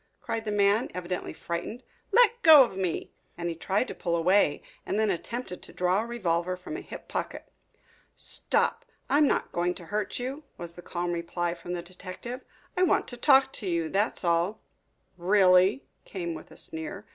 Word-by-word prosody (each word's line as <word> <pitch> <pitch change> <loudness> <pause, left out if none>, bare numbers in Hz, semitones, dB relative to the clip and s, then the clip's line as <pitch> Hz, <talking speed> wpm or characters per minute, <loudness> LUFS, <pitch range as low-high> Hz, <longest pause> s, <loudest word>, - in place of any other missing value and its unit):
cried 225 0 -4
the 210 - -2
man, 205 +2 +3
evidently 180 0 -4
frightened. 175 +9 -5 0.3
"Let 475 -1 +5
go 310 - +10
of 235 - -4
me!" 185 -3 -2 0.2
And 170 0 -2
he - - -2
tried 195 +8 0
to - - -5
pull 170 -1 -2
away 170 -2 +3 0.2
and - - -2
then 215 -2 +3
attempted 190 +1 -5
to - - -13
draw 180 +3 +2
a 230 - -5
revolver 180 -6 -1
from 180 +12 -7
a 365 - -5
hip - - -10
pocket. - - -5 0.6
"Stop! - - 0 0.3
I 285 - +5
am 300 - +5
not - - 0
going 175 +1 0
to 175 - -10
hurt 210 -1 -1
you," 265 +5 -4
was 170 -1 -7
the 175 - -11
calm 175 0 -3
reply 170 0 -2
from 175 0 -7
the 175 -1 -4
detective. 185 +8 -8 0.3
"I 365 - 0
want 365 - +3
to 245 - -6
talk 265 +1 +5
to 205 - -5
you, 170 -2 0
that's 200 +3 0
all." 170 +5 +1 0.6
"Really?" 190 +4 +4 0.2
came 170 -4 -4
with 155 - -10
a - - -14
sneer. 160 +6 -4
185 Hz, 190 wpm, -28 LUFS, 175-235 Hz, 0.6 s, go